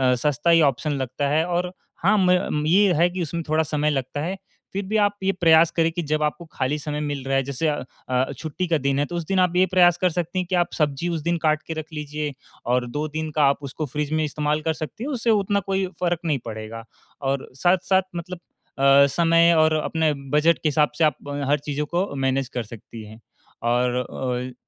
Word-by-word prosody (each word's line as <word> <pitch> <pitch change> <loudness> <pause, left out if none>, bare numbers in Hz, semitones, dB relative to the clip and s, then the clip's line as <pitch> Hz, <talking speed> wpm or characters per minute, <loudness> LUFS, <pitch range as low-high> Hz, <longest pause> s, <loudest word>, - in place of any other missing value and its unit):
सस्ता 150 +5 0
ही 165 -1 +6
ऑप्शन 150 +5 -4
लगता 130 +3 -2
है। 155 +3 +2
और 180 0 -1 0.3
हाँ, 205 +4 +4
मय 180 -2 +3 0.3
ये 195 +2 +5
है 170 +3 +3
कि 180 +1 -4
उसमें 170 +1 -3
थोड़ा 155 +1 +2
समय 150 0 0
लगता 135 0 -2
है। 185 +5 -3 0.4
फिर 200 - -2
भी 215 +1 0
आप 205 -1 +2
ये 195 - +3
प्रयास 165 -1 +6
करें 165 0 +3
कि 175 +1 -3
जब 155 0 +1
आपको 150 +3 -2
खाली 130 +3 -1
समय 150 0 -4
मिल 145 -3 -3
रहा 135 - +1
है 135 - +1
जैसे 140 +4 -2
अ 150 - +1 0.3
अ, 130 +2 +1
छुट्टी 165 +3 -4
का 165 -1 +2
दिन 140 0 0
है 145 - +2
तो 175 - -7
उस 170 -2 -3
दिन 195 -1 +1
आप 180 -1 +2
ये 185 +1 +5
प्रयास 175 -2 +5
कर 185 - +4
सकती 175 +2 -2
हैं 180 - -1
कि 185 - +1
आप 175 -1 +2
सब्जी 150 +2 -1
उस 165 -2 -2
दिन 170 +2 0
काट 155 -1 +2
के 165 - -3
रख 155 - -6
लीजिए 150 -1 -4 0.3
और 125 +1 +1
2 150 +3 -2
दिन 155 +1 -4
का 150 - +3
आप 140 +1 +1
उसको 140 +3 -4
फ़्रिज 150 +2 -3
में 155 0 +1
इस्तेमाल 150 +1 -1
कर 160 +1 0
सकती 155 +9 -7
हैं, 290 - -3
उससे 240 -2 -1
उतना 200 -2 +2
कोई 195 0 -1
फ़र्क 175 -2 0
नहीं 150 -4 +1
पड़ेगा। 110 0 -7 0.4
और 135 0 -2
साथ-साथ 185 +5 +2
मतलब 175 +1 -6 0.4
अ, 140 +1 +6
समय 165 +3 +4
और 155 0 +4
अपने 160 -2 +1 0.2
बजट 155 +3 +3
के 155 - +3
हिसाब 150 0 +2
से 165 - +2
आप 150 -3 +3
अ, - - -4 0.2
हर 145 0 +3
चीज़ों 145 +1 -3
को 175 +1 -2
मैनेज 135 -1 0
कर 120 - -1
सकती 115 +1 -11
हैं। 110 +1 -13 0.4
और 120 +1 +1 0.6
अ, - - -16
155 Hz, 230 wpm, -23 LUFS, 140-175 Hz, 0.6 s, ही